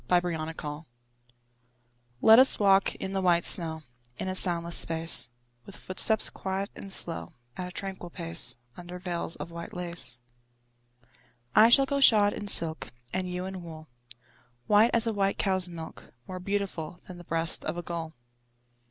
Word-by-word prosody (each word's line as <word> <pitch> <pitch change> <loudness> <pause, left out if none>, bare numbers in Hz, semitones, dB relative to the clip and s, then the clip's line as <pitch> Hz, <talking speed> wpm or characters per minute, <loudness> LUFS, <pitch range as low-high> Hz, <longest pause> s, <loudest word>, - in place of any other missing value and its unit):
VELVET 165 -3 0
SHOES 150 +2 -7 1.4
Let 225 +2 +8
us 265 - +4
walk 195 -1 +3
in 190 - -6
the 195 - -1
white 175 -2 +2
snow 160 -2 0 0.3
In - - -5
a 185 - -2
soundless 170 -2 -1
space; 165 -6 +2 0.3
With 200 - -12
footsteps 220 +3 +1
quiet 195 +1 -4
and 195 - -4
slow, 170 -2 +2 0.2
At 180 - -5
a - - -9
tranquil 190 -1 -6
pace, 165 -8 +1 0.2
Under 180 0 -9
veils 175 -2 -3
of 170 - -8
white 170 +1 -9
lace. 170 -9 -3 1.4
I 220 +2 +7
shall 270 +3 +6
go 280 +1 -2
shod 210 -6 +6
in 205 - -7
silk, 165 -4 +3 0.3
And 185 0 -2
you 180 +1 -4
in 190 -1 -7
wool, 160 -2 -11 0.8
White 210 +3 +4
as 230 0 +3
a 225 - -1
white 195 -1 0
cow's 190 -2 0
milk, 165 -2 -9 0.2
More 185 -1 -6
beautiful 185 -4 -4
Than 180 -1 -11
the - - -11
breast 165 0 0
of - - -3
a 175 - -5
gull. 165 -2 -6
180 Hz, 160 wpm, -27 LUFS, 165-195 Hz, 1.4 s, Let